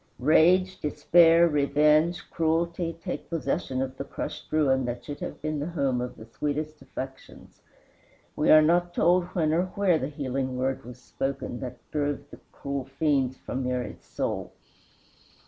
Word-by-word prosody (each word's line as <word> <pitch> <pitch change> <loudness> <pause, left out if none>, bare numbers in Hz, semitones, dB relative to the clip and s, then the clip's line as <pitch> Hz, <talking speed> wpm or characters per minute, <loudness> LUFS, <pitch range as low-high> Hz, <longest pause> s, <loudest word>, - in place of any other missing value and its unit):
Rage, 180 +7 +4
despair, 165 +2 +5
revenge, 150 +3 +2
cruelty, 165 +1 0
take 180 - -5
possession 135 -4 -1
of 130 0 -6
the - - -3
crushed - - -7
ruin 135 -4 +2
that 120 0 -5
should 145 - -6
have - - -6
been 155 -1 -2
the 145 - -3
home 140 -7 0
of 125 - -5
the 110 - -10
sweetest 150 +5 -4
affections. 135 0 -9 0.7
We 150 - +1
are 155 0 +8
not 175 +2 +2
told 175 +1 +3
when 155 -3 +2
or 175 +3 +2
where 190 -5 +3
the 130 - -2
healing 135 -3 -3
word 130 0 -2
was 125 0 -10
spoken 135 -1 -4
that 125 -1 -6
drove 145 -2 -2
the - - -11
cruel 140 -2 -4
fiends 135 -2 0
from 130 +1 -4
Mary's 125 -3 -3
soul. - - -4
145 Hz, 155 wpm, -27 LUFS, 130-165 Hz, 0.7 s, are